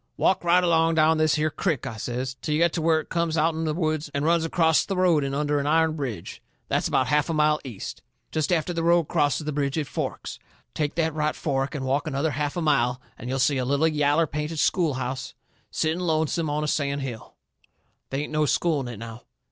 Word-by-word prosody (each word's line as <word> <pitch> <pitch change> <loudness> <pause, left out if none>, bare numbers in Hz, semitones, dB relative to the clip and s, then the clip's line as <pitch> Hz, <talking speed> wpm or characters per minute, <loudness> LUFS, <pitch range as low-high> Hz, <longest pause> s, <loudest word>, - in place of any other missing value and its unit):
"Walk 190 - +2
right 175 +1 +4
along 165 -1 +3
down 160 0 +4
this 155 -1 +3
here 155 0 0
crick," 160 -7 -1
I 110 - -5
says, 125 +3 -4
"till 150 - -1
you - - +1
get 170 -1 +3
to 165 - -1
where 160 0 +3
it - - -17
comes 170 -1 0
out'n 160 0 +1
the 155 - 0
woods 155 -3 -1
and 140 +1 0
runs 170 0 +3
acrost 165 -1 +2
the 195 - -2
road 175 -5 +3
in 135 0 -2
under 145 0 0
an 140 - -2
iron 160 +1 +3
bridge. 125 - -5 0.3
That's - - +1
about 130 - +2
a - - -5
half 150 +2 +2
a 165 - 0
mile 150 0 +3
east. 120 -7 -7 0.3
Jest 155 +2 -1
after 175 0 +1
the 165 - -2
road 170 +1 +4
crosses 145 -2 0
the 150 - -2
bridge 140 0 -1
it 155 - 0
forks. - - -5 0.3
Take 150 -1 -2
the 160 -1 +1
right 150 0 -1
fork 135 0 -2
and 135 -2 -3
walk 140 +4 0
another 150 +2 0
half 145 +3 -2
a 175 - -1
mile 125 -5 +2 0.2
and 120 - -8
you'll 135 - -1
see 135 +2 +2
a 130 - 0
little 140 +5 +2
yaller 150 +1 +2
painted 150 +2 -4
schoolhouse 135 -6 -1 0.3
setting 160 +2 -1
lonesome 160 -2 0
on 150 +1 -1
a - - -1
sand 140 -1 -1
hill. 125 -5 -7 0.7
They 135 +2 -2
ain't 150 - -7
no 155 -1 +2
school 160 +1 +1
in 130 - -4
it 120 -3 -7
now. 115 +1 -8
150 Hz, 235 wpm, -25 LUFS, 140-160 Hz, 0.7 s, right